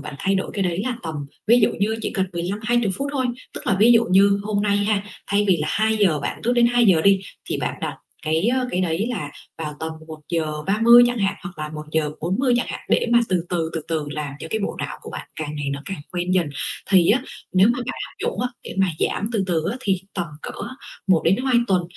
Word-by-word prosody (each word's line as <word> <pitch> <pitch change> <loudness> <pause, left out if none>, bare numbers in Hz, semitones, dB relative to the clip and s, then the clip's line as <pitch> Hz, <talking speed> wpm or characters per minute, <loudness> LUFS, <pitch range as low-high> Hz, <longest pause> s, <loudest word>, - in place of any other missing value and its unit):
bạn 145 0 -7
thay 195 +4 +1
đổi 190 - -1
cái 200 - 0
đấy 180 +2 -1
là 250 -2 -1
tầm 160 -1 -4 0.3
ví 235 +2 +6
dụ - - +5
như 220 +2 +1
chỉ - - -1
cần 190 -1 +1
15-20 205 +5 0
phút 280 +1 -2
thôi, 260 -3 0 0.3
tức - - -7
là 195 - +3
ví 235 +2 +7
dụ 230 0 +5
như 200 +1 +5
hôm 205 -1 0
nay 205 -1 +2
ha, 205 0 +1 0.2
thay 205 +1 +2
vì 180 - +5
là 150 0 -2
2:00 210 -8 +2
bạn - - -4
thức 245 - +2
đến 240 -1 +5
2:00 235 -8 +4
đi 195 -1 +5 0.3
thì - - +1
bạn - - -2
đặt - - -3 0.3
cái, 160 +5 +1
ơ, 255 +1 +1
cái 180 - 0
đấy 180 +4 0
là 150 -11 -3 0.3
vào 150 -2 -4
tầm 160 0 -3 0.2
1:30 165 +9 +3
chẳng 245 0 -1
hạn, 195 -1 +1
hoặc 175 -2 -8
là 155 - -3
1:40 155 - -1
chẳng 245 - 0
hạn - - -5
để - - +3
mà 235 - +7
từ 180 -2 +1
từ, 165 -2 -1
từ 160 - -1
từ 155 -3 -1
làm 150 -1 -4
cho - - -5
cái 220 - 0
bộ - - -3
não - - -4
của - - -9
bạn - - -7
càng 150 -1 -4
ngày 145 -1 -3
nó 140 0 -5
càng 195 -4 -5
quen 180 +1 -1
dần. 180 -3 +3 0.4
Thì 180 -3 +6
á 250 +4 +3 0.3
nếu 185 +2 +6
mà 240 +1 +1
bạn 255 - -4
áp - - -16
dụng - - -2
á 250 - 0 0.2
để - - -7
mà 195 - +4
giảm 210 - 0
từ 205 -4 +1
từ 165 -4 0
á 245 - -3
thì 195 -6 0
tầm 175 -2 -2 0.2
cỡ - - -5 0.6
một 175 -4 +4
đến 180 +4 +4
hai 255 0 +1
tuần 185 -2 +3
190 Hz, 245 wpm, -22 LUFS, 160-220 Hz, 0.6 s, ví